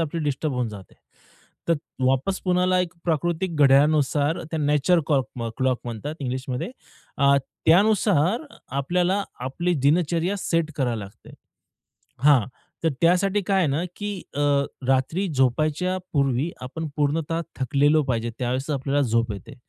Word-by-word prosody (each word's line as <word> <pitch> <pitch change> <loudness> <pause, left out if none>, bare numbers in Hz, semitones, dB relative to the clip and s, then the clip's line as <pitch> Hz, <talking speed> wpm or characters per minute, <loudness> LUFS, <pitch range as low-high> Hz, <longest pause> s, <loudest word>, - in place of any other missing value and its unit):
आपली 165 +1 -2
डिस्टर्ब 145 +1 -1
होऊन 125 -2 -1
जाते. 100 -3 -11 0.7
तर 170 - +5 0.3
वापस 135 +9 +1
पुन्हाला 180 0 +2
एक 180 -1 -2
प्राकृतिक 170 +1 -1
घड्याळानुसार 145 +2 +3
त्याला 155 -2 -3
नॅचरल 150 +4 +3
कॉक 135 -4 +2 0.2
अ, 115 - -2
क्लॉक 130 -2 +1
म्हणतात 120 +6 -5
इंग्लिशमध्ये, 130 - -3 0.5
अ, 140 0 +5 0.3
त्यानुसार 200 - +3 0.3
आपल्याला 175 +8 0 0.3
आपली 175 +6 -1
दिनचर्या 170 +4 +2
सेट 165 -3 0
करावी 120 -5 0
लागते. 100 -1 -12 0.9
हां. 140 -7 +5 0.4
तर - - +4
त्यासाठी 185 +4 +3
काय 195 +1 +1
आहे 185 - +3
ना, 145 +5 0
की 205 0 -4 0.3
अ, 145 - -1 0.5
रात्री 135 +9 +1
झोपायच्या 155 +8 +1 0.2
पूर्वी 140 +1 +1
आपण 160 +6 -5
पूर्णतः 155 +2 0 0.2
थकलेलो 145 +4 +3
पाहिजे. 120 -3 -1
त्यावेळेस 130 +3 -2
आपल्याला 140 0 0
झोप 115 0 +1
येते, 100 - -9
150 Hz, 135 wpm, -24 LUFS, 130-175 Hz, 0.9 s, तर